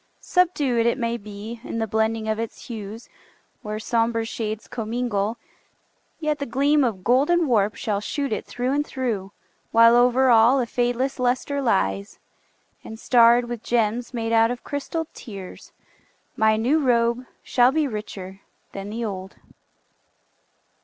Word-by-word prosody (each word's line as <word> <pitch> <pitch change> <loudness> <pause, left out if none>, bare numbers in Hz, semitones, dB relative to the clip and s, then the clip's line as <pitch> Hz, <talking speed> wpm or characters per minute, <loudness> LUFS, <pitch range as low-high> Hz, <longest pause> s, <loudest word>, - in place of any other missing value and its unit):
Subdued, 285 -10 +1
It 235 - +1
may 235 -2 -1
be, 215 +1 -8
in - - -5
the 225 - 0
blending 220 0 -1
of 220 0 -1
its 230 -1 -6
hues, 220 0 -7 0.5
Where 210 0 -4
somber 230 +1 0
shades 220 -1 -4
commingle, 225 -2 -2 0.8
yet 305 -2 -1
the 280 - -3
gleam 285 +4 +2
Of 210 -7 -2
golden 295 - +3
warp 210 -6 +2
shall 205 -2 -2
shoot 280 +3 -2
it 215 - -3
through 245 +1 -2
and 290 +1 +1
through, 230 -9 -3 0.4
While 230 +1 +7
over 250 +1 +4
all 235 +4 +6
a 250 - +1
fadeless 245 +3 -1
luster 255 +3 0
lies, 95 - 0 0.7
And 220 0 -9
starred 240 0 +5
with 240 -2 -5
gems 235 0 0
made 230 -2 -3
out 225 0 +4
of 245 0 -5
crystalled 315 +3 -4
tears, 195 -5 -10 0.6
My 220 0 +3
new 255 +8 +2
robe 240 -2 +1 0.2
shall 245 0 +4
be 305 0 +1
richer 200 -4 -7 0.3
than 195 +1 -7
the 230 +2 -3
old. 190 -2 -6
235 Hz, 145 wpm, -23 LUFS, 215-255 Hz, 0.8 s, While